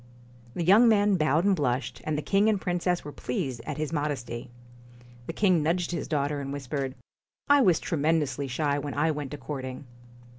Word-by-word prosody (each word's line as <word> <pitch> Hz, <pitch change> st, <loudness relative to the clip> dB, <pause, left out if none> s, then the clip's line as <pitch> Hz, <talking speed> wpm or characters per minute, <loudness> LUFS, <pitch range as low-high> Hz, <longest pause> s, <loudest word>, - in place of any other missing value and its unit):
The 175 Hz, -, -1 dB
young 210 Hz, +7 st, +6 dB
man 205 Hz, -2 st, +4 dB
bowed 155 Hz, +1 st, +2 dB
and 200 Hz, -1 st, +4 dB
blushed; 130 Hz, -5 st, -2 dB
and 155 Hz, -1 st, -1 dB
the 150 Hz, -, -3 dB
king 200 Hz, +2 st, +3 dB
and 210 Hz, -3 st, +1 dB
princess 180 Hz, -1 st, -1 dB
were 145 Hz, -, -6 dB
pleased 135 Hz, -, -4 dB
at -, -, -4 dB
his 155 Hz, +1 st, -3 dB
modesty. 140 Hz, -6 st, -3 dB, 0.8 s
The -, -, -4 dB
king 185 Hz, -3 st, +3 dB
nudged 170 Hz, +3 st, 0 dB
his 170 Hz, -6 st, -3 dB
daughter, 145 Hz, -1 st, -1 dB
and 135 Hz, 0 st, -5 dB
whispered: 135 Hz, -1 st, -4 dB, 0.5 s
*I 285 Hz, 0 st, +6 dB
was 180 Hz, -9 st, +4 dB
tremendously 150 Hz, -3 st, 0 dB
shy 145 Hz, +3 st, 0 dB
when 145 Hz, 0 st, -5 dB
I 155 Hz, +3 st, +2 dB
went 145 Hz, -1 st, -5 dB
a -, -, -9 dB
courting.' 130 Hz, -2 st, -6 dB
150 Hz, 185 wpm, -27 LUFS, 140-180 Hz, 0.8 s, young